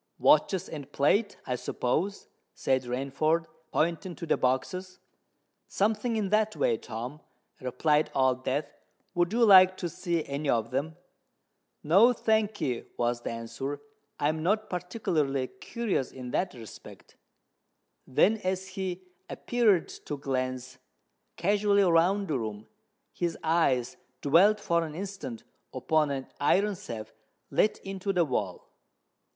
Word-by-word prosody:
"Watches 190 -3 +3
and 145 -3 -8
plate, 200 +11 +2
I 125 - -1
suppose?" 160 +11 -2 0.3
said 130 -1 +1
Rainford, 140 +6 0 0.3
pointing 170 +3 -1
to - - -6
the - - +2
boxes. 180 +9 -1 0.7
"Something 220 +3 0
in 210 -3 -1
that 215 +1 +2
way, 115 - +1
Tom," 125 +7 -7 0.4
replied 150 +4 +1
Old 130 -1 +2
Death. 140 +4 0 0.5
"Would 175 0 +1
you 235 +1 +4
like 185 -2 +8
to 175 - -3
see 170 -1 -2
any 140 +1 -3
of 115 0 +1
them?" 145 +5 -2 0.9
"No, 200 +11 +6
thank'ee," 210 - 0
was 120 0 0
the - - -4
answer. 115 +5 -5 0.4
"I 145 - +2
am 155 0 -2
not 210 +6 0
particularly 165 - -1
curious 195 - -3
in 125 -2 -8
that 190 - -1
respect." 115 -4 -12 0.9
Then, 205 +11 +3
as 190 -1 -3
he 185 -1 -4 0.3
appeared 220 -8 +2 0.2
to 145 - -3
glance 130 -2 -3 0.6
casually 200 +2 +3
round 185 +3 +3
the 145 -5 0
room, 110 -1 -5 0.5
his 170 -2 -2
eyes 155 -7 +1 0.3
dwelt 185 +9 +5
for 170 -4 +1
an 155 -2 -6
instant 190 - -6 0.3
upon 155 -2 +1
an 135 -2 -3
iron 200 +8 +3
safe 115 - -8 0.4
let 215 - +2
into 195 0 -3
the 180 -3 +2
wall. 100 - -3
165 Hz, 130 wpm, -28 LUFS, 130-195 Hz, 0.9 s, like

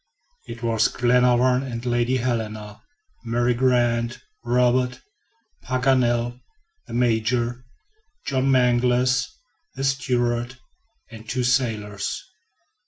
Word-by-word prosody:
It 115 +1 -9
was 115 -2 +2
Glenarvan 125 +1 +3
and 120 -3 -6
Lady 120 +1 +1
Helena, 110 -4 -3 0.4
Mary 120 +1 +1
Grant, 120 -1 +1 0.2
Robert, 125 +1 +1 0.6
Paganel, 125 -1 +1 0.5
the 115 - -9
Major, 120 +1 0 0.6
John 135 -1 0
Mangles, 125 0 +2 0.5
the 135 - -4
steward, 125 -3 0 0.5
and 110 -1 -10
the - - -24
two 125 +2 -1
sailors. 110 -6 -1
120 Hz, 95 wpm, -23 LUFS, 115-125 Hz, 0.6 s, Glenarvan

